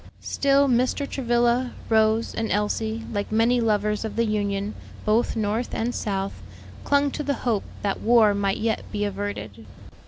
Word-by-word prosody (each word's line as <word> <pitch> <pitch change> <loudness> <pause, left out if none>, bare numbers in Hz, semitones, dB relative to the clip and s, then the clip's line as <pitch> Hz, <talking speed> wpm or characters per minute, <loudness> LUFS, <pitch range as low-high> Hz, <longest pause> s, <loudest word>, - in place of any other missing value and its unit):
Still 280 0 +3
Mr. 255 +3 +1
Travilla, 240 -1 +1
Rose, 220 0 +2
and 225 0 -2
Elsie, 220 +2 -1
like 205 0 -2
many 230 +3 +3
lovers 210 -1 +1
of 220 - -5
the 230 - +2
Union, 205 -1 -1 0.3
both 220 +3 +2
North 220 +2 -1
and 240 +2 -1
South, 195 - -3 0.4
clung 285 0 +2
to 300 - -4
the 285 -1 -1
hope 225 -5 +1 0.2
that 200 -1 -1
war 225 -2 +5
might 200 -1 0
yet 220 0 -1
be 205 -1 -1
averted. 190 - -5
220 Hz, 155 wpm, -24 LUFS, 205-240 Hz, 0.4 s, war